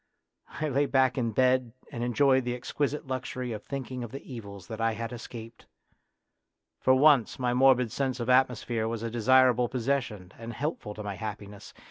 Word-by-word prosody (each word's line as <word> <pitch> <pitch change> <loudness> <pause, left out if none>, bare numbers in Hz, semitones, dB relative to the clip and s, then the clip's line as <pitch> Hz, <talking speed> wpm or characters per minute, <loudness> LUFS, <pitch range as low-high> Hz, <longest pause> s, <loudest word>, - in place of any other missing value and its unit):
" - - -48
I 155 - 0
lay 140 0 +1
back 130 -1 +3
in 120 -3 0
bed 130 0 +2 0.2
and 120 - -4
enjoyed 130 +2 +3
the 120 0 -2
exquisite 145 +4 -2
luxury 130 -1 -4
of 105 -2 -5
thinking 130 -1 -5
of 120 - -7
the 135 - -8
evils 100 -5 -9
that 115 -1 -7
I 115 0 +2
had 115 +2 -5
escaped. 115 -1 -10 1.1
For 130 - +4
once 135 -4 +4
my 125 -1 0
morbid 125 -2 +4
sense 130 -2 -2
of 120 - -3
atmosphere 125 -3 +2
was 115 0 -4
a 115 - -3
desirable 125 +1 +4
possession 120 -7 -2
and 115 0 -7
helpful 140 -8 -4
to 105 - -7
my 100 -2 -5
happi 105 0 -6
ness. 100 -1 -12
125 Hz, 185 wpm, -28 LUFS, 115-130 Hz, 1.1 s, For